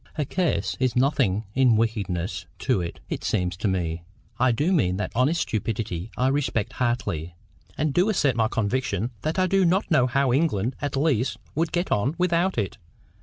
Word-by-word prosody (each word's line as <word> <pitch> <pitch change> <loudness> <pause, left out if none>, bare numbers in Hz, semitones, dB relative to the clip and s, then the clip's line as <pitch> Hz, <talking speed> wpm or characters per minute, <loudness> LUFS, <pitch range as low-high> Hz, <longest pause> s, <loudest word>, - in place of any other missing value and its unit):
A 150 - 0
curse 180 +3 0
is 130 -3 +1
nothing 125 -6 +2
in 130 -3 +4
wickedness 100 -6 -2
to 95 - +1
it, 85 -1 -5
it - - -4
seems 90 -1 0
to 105 - -1
me. 85 -3 -1 0.4
I 130 0 +4
do 145 +10 +1
mean 90 - +2
that 105 - -3
honest 140 +8 +2
stupidity 105 -3 -3
I 130 +1 +2
respect 135 -6 -1
heartily, 90 -10 -2 0.4
and 150 -1 0
do 180 +7 +3
assert 145 -10 +2
my 110 -2 +2
conviction 115 0 -1
that 155 +4 -2
I 185 - +3
do 195 +1 +3
not 185 +2 +1
know 130 -6 +4
how 130 0 +2
England 130 -6 +1
at 145 -2 -2
least 135 -4 +1 0.2
would 160 +2 0
get 175 +1 -1
on 120 +10 +1
without 180 0 +1
it. 105 -4 -2
125 Hz, 180 wpm, -25 LUFS, 105-155 Hz, 0.4 s, in